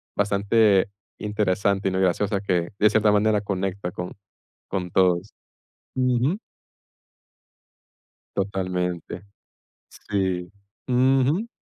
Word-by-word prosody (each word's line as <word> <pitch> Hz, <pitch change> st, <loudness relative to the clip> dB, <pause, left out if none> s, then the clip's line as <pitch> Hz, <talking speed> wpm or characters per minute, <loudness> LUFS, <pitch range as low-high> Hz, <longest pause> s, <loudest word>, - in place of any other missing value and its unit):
bastante 100 Hz, 0 st, +3 dB, 0.3 s
interesante 100 Hz, -1 st, 0 dB
y, -, -, +1 dB
no 95 Hz, -, -1 dB
y -, -, +1 dB
graciosa 100 Hz, +2 st, +1 dB
que, 90 Hz, -4 st, 0 dB
de 105 Hz, -, +6 dB
cierta 105 Hz, 0 st, +3 dB
manera, 105 Hz, 0 st, +3 dB
conecta 95 Hz, -2 st, -3 dB
con 90 Hz, 0 st, -6 dB, 0.6 s
con 90 Hz, -2 st, -2 dB
todos, 90 Hz, +2 st, +2 dB, 0.6 s
ujú. 130 Hz, -, +1 dB, 2.0 s
Totalmente, 90 Hz, -3 st, -2 dB, 0.9 s
sí, 95 Hz, -3 st, -1 dB, 0.4 s
ujú. 135 Hz, -, +2 dB
100 Hz, 95 wpm, -24 LUFS, 95-110 Hz, 2.0 s, de